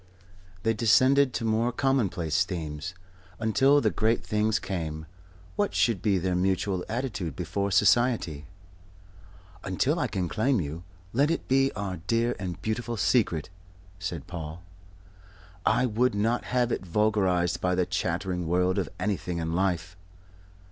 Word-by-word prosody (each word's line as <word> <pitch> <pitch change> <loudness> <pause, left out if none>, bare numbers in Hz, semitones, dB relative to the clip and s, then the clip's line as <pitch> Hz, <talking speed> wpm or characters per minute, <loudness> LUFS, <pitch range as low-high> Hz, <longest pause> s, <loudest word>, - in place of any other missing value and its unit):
They 115 - +2
descended 130 +5 +4
to 115 - -2
more 115 +2 +1
commonplace 95 - +1
themes. 85 -1 -5 0.4
Until 135 +6 +4
the 110 - +2
great 110 +6 +1
things 110 0 +1
came, 80 -5 -4 0.5
what 205 -1 0
should 115 -6 +2
be 100 -3 +2
their 90 +1 -1
mutual 95 0 0
attitude 105 - -3
before 95 +4 -2
Society? 100 - +2 1.2
"Until - - 0
I - - +1
can 90 -2 -2
claim 125 +6 +1
you, 80 0 -4 0.3
let 140 +5 +3
it 165 - -2
be 135 +1 +3
our 95 -3 -4
dear 115 +1 +1
and 90 -3 -4
beautiful 115 +1 -2
secret," 95 -7 +1 0.5
said 85 -5 -4
Paul. 85 -1 -7 1.0
"I 125 - +3
would 120 0 +1
not 115 +4 0
have 125 -1 +1
it - - -2
vulgarized 95 -2 +1
by 90 0 +1
the 90 0 +2
chattering 90 0 -2
world 90 +2 +1
for - - -11
anything 90 -3 -2
in 80 0 -2
life." 90 -1 -1
95 Hz, 140 wpm, -27 LUFS, 90-115 Hz, 1.2 s, descended